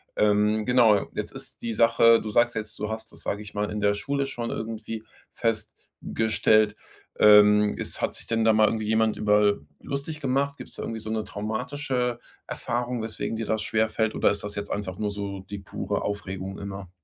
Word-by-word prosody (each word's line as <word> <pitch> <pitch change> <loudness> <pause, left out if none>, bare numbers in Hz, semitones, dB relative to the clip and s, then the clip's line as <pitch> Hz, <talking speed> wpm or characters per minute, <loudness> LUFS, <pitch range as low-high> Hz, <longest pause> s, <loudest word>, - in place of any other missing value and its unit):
Ähm, 105 +1 +2
genau, 115 -5 +4
jetzt - - -4
ist - - -9
die 115 -1 -2
Sache, 115 0 +5
du 110 - -5
sagst 120 +2 +3
jetzt: 110 0 -5
„Du 105 +1 -3
hast 110 0 -6
das“, - - -10
sage 100 - -2
ich 105 0 -11
mal, 105 0 -1
„in 105 - -3
der 105 0 +3
Schule 140 +7 -1
schon 120 -3 -4
irgendwie 110 0 -5 0.3
festgestellt“, 110 -1 0 0.4
ähm, 105 0 +7
ist - - -4
hat - - 0
sich - - -6
denn 115 -1 +1
da 110 - +5
mal 110 0 +5
irgendwie 110 -1 -1
jemand 110 0 +2
über 105 -1 +3 0.2
lustig 140 +2 -5
gemacht? 140 0 0
Gibt's - - -9
da - - -5
irgendwie 115 -1 -4
so 110 0 -7
'ne 110 -1 -1
traumatische 125 +3 -2 0.3
Erfahrung, 120 0 -2
weswegen 110 0 -3
dir 115 - -3
das 110 -1 0
schwerfällt 110 0 0
oder - - +3
ist 100 - -3
das 105 0 -5
jetzt 100 0 -5
einfach 95 -3 -3
nur 105 -1 -1
so 100 -1 -5
die 100 -1 -5
pure 95 - -3
Aufregung 95 -2 -4
immer? 100 -2 -7
110 Hz, 195 wpm, -26 LUFS, 105-115 Hz, 0.4 s, ähm